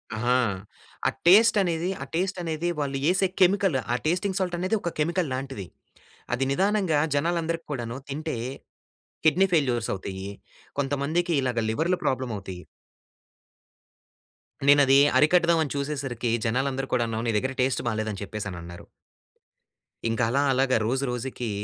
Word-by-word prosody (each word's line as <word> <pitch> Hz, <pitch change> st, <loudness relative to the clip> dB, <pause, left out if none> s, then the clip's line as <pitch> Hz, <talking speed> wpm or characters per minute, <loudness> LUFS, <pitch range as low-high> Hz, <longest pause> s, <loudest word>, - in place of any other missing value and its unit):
అహా! 125 Hz, +3 st, +2 dB, 0.7 s
ఆ -, -, +4 dB, 0.2 s
టేస్ట్ 215 Hz, +4 st, +7 dB
అనేది 175 Hz, -1 st, -1 dB
ఆ -, -, -6 dB
టేస్ట్ 185 Hz, +3 st, -1 dB
అనేది 165 Hz, +1 st, -2 dB
వాళ్ళు 140 Hz, -2 st, -1 dB
ఏసే 190 Hz, +1 st, +3 dB
కెమికల్, 185 Hz, -5 st, +4 dB, 0.2 s
ఆ -, -, +2 dB
టేస్టింగ్ 185 Hz, +4 st, 0 dB
సాల్ట్ 180 Hz, -2 st, -1 dB
అనేది 185 Hz, +5 st, 0 dB
ఒక 170 Hz, -, -2 dB
కెమికల్ 170 Hz, +1 st, 0 dB
లాంటిది. 130 Hz, -6 st, -5 dB, 0.7 s
అది 125 Hz, +2 st, 0 dB
నిదానంగా 190 Hz, -2 st, +2 dB, 0.2 s
జనాలందరిక్కూడాను 160 Hz, -6 st, -2 dB
తింటే 155 Hz, -1 st, -3 dB, 0.9 s
కిడ్నీ 180 Hz, +5 st, +5 dB
ఫెయిల్యూర్స్ 125 Hz, -7 st, +1 dB
అవుతయి. 95 Hz, 0 st, -6 dB, 0.5 s
కొంతమందికి 145 Hz, +5 st, 0 dB
ఇలాగ 125 Hz, -3 st, -1 dB
లివర్‌లు 165 Hz, +11 st, +1 dB
ప్రాబ్లమ్ 130 Hz, -3 st, -1 dB
అవుతయి. 95 Hz, -2 st, -8 dB, 2.0 s
నేనది 140 Hz, -1 st, +6 dB, 0.2 s
అరికడదాం 170 Hz, +1 st, +4 dB
అని 145 Hz, -, -4 dB
చూసేసరికి 135 Hz, -5 st, -2 dB, 0.2 s
జనాలందరూ 135 Hz, +3 st, -1 dB
కూడాను, 115 Hz, -2 st, -1 dB
నీ 115 Hz, -, +1 dB
దగ్గర 130 Hz, +4 st, -1 dB
టేస్ట్ 130 Hz, +1 st, +1 dB
బాలేదని 110 Hz, -3 st, -3 dB
చెప్పేసనన్నారు. 85 Hz, -5 st, -7 dB, 1.2 s
ఇంకా 115 Hz, +2 st, 0 dB
అలా 140 Hz, +4 st, +2 dB
అలాగా 130 Hz, -1 st, +2 dB
రోజు 130 Hz, +3 st, 0 dB
రోజుకి 125 Hz, -1 st, -4 dB
140 Hz, 125 wpm, -26 LUFS, 120-170 Hz, 2.0 s, టేస్ట్